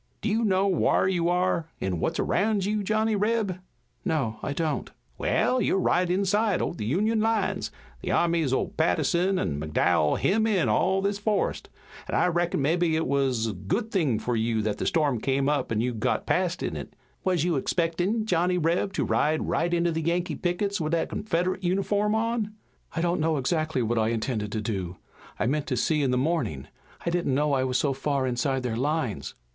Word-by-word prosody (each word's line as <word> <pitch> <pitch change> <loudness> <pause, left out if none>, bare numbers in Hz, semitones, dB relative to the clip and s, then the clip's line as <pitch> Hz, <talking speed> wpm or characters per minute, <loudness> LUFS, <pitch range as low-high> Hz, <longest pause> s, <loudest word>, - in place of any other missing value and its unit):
Do 220 - +1
you 225 +2 +1
know 195 -2 +2
whar 185 -1 +2
you 175 -2 +1
are 175 -2 +1
an' 90 -3 -2
what's - - -1
around 205 0 +1
you, 210 +1 0
Johnny 215 +2 +1
Reb?" 205 -3 0 0.4
"No, 130 -9 -1
I - - -3
don't." 155 +1 -2 0.3
"Wa'al, 255 - +2
you're - - +2
right 180 -1 +2
inside 200 +2 +2
o' - - -1
the 105 -11 -5
Union 215 - +1
lines. 220 -2 0 0.3
The - - -4
armies 165 -5 +2
o' 130 - +1
Patterson 175 +3 +1
an' 75 - -1
McDowell 75 +1 +2
hem 220 +3 +2
in 195 -6 +2
all 190 +1 +2
this 200 0 0
forest, 210 0 -1 0.4
an' - - -2
I - - +3
reckon 175 -4 0
mebbe 165 +5 +1
it 160 -2 +2
wuz 135 -4 +1
a 110 - -2
good 95 - -2
thing 150 - +1
fur 120 - -2
you 110 -1 0
that 105 -1 -2
the - - -1
storm 145 -7 +1
came 135 +1 +1
up 145 -5 0
an' 110 -1 +1
you 125 +1 -1
got 120 +3 -1
past 180 -1 0
in - - -2
it. - - -7 0.3
Wuz 180 -4 +1
you 175 -2 +1
expectin', 175 - 0
Johnny 180 -2 +1
Reb, 170 +4 +1
to - - 0
ride 155 +1 +1
right 170 +1 0
into 170 0 +2
the 160 0 -2
Yankee 170 +2 0
pickets 195 +2 -1
with 155 +1 -1
that 165 - +1
Confedrit 185 -1 -1
uniform 200 +3 +1
on?" 220 -1 -1 0.4
"I 165 - 0
don't 170 -1 +1
know 160 0 +1
exactly 155 -1 0
what 115 +1 0
I 110 - +2
intended 110 -2 -2
to 110 - -1
do. 95 -5 -3 0.4
I - - +1
meant 145 +4 0
to 130 -5 -1
see 155 +3 +1
in 135 - +1
the 125 - +1
morning. 130 - -1 0.4
I 170 - +1
didn't 170 -6 0
know 145 +1 +1
I 130 -1 +2
was 130 -1 0
so 140 -2 +1
far 135 0 -1
inside 130 +1 -1
their 120 -3 -2
lines." 130 - -2
165 Hz, 200 wpm, -26 LUFS, 130-190 Hz, 0.4 s, I